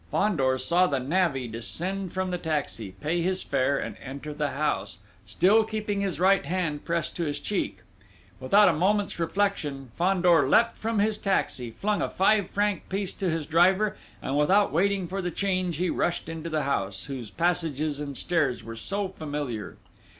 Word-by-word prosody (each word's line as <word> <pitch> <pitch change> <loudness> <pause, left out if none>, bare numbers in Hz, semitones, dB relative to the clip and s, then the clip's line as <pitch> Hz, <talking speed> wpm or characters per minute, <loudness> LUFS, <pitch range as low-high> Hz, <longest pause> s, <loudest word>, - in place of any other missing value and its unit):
Fandor 135 - +1
saw 175 +8 +3
the 140 -4 0
navvy 140 -2 0
descend 175 - -4
from 185 0 -2
the 180 - -2
taxi, 140 - -3
pay 170 +3 0
his 185 +2 0
fare, 140 +2 +1
and - - -4
enter 140 +3 -6
the 150 -1 -1
house, 105 -10 -2 0.3
still 195 - +4
keeping 215 -2 -2
his 185 -6 -2
right 195 +1 +4
hand 165 -5 -2
pressed 170 0 -2
to 170 - -2
his 145 -3 -2
cheek. - - -2 0.6
Without 200 +11 +5
a 180 - +4
moment's 195 +4 +1
reflection, 160 - -1
Fandor 175 -5 +3
leapt 230 +8 +4
from 225 0 -2
his 210 +1 +1
taxi, 135 - 0
flung 205 - -1
a - - 0
five 200 0 +2
franc 205 0 -1
piece 195 0 -2
to 190 -3 -2
his 160 -2 -1
driver, 185 +6 +3 0.3
and 135 - -2
without 190 +8 +4
waiting 195 +2 +1
for 195 +3 -3
the 180 - -2
change 185 -2 -1
he 180 0 0
rushed 175 -2 -1
into 165 0 -5
the 155 -2 0
house, 100 -8 -2
whose 130 -6 -6
passages 155 - 0
and 140 -2 -5
stairs 155 -8 0
were 115 0 -7
so 195 - -2
familiar. 145 - -5
170 Hz, 175 wpm, -27 LUFS, 145-195 Hz, 0.6 s, Without